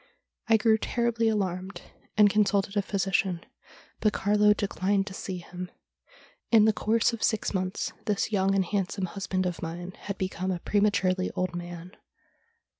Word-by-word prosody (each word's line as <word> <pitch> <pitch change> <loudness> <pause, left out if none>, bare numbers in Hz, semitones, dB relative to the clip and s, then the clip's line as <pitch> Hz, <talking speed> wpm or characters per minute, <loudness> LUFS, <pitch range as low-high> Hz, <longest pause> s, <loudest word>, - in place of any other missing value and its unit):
I 225 - +7
grew 220 0 +3
terribly 235 -1 0
alarmed, 190 -3 -2 0.3
and 210 -1 +8
consulted 200 -1 +2
a 205 - +3
physician, 190 -2 0 0.5
but 215 -1 +2
Carlo 210 +1 +3
declined 200 -1 +1
to 195 - -8
see 190 -1 -5
him. 180 +1 -7 0.8
In 220 -2 +7
the 220 - +4
course 225 +3 +2
of 230 - -5
six 220 -2 0
months 185 -1 -2
this 210 +1 0
young 195 -1 +2
and 190 -1 +2
handsome 195 0 -1
husband 185 0 -2
of 180 -2 -3
mine 175 +2 -5
had 200 -1 -6
become 185 0 -3
a 185 - 0
prematurely 190 -1 +1
old 185 -1 -1
man. 175 0 -7
195 Hz, 155 wpm, -28 LUFS, 185-210 Hz, 0.8 s, and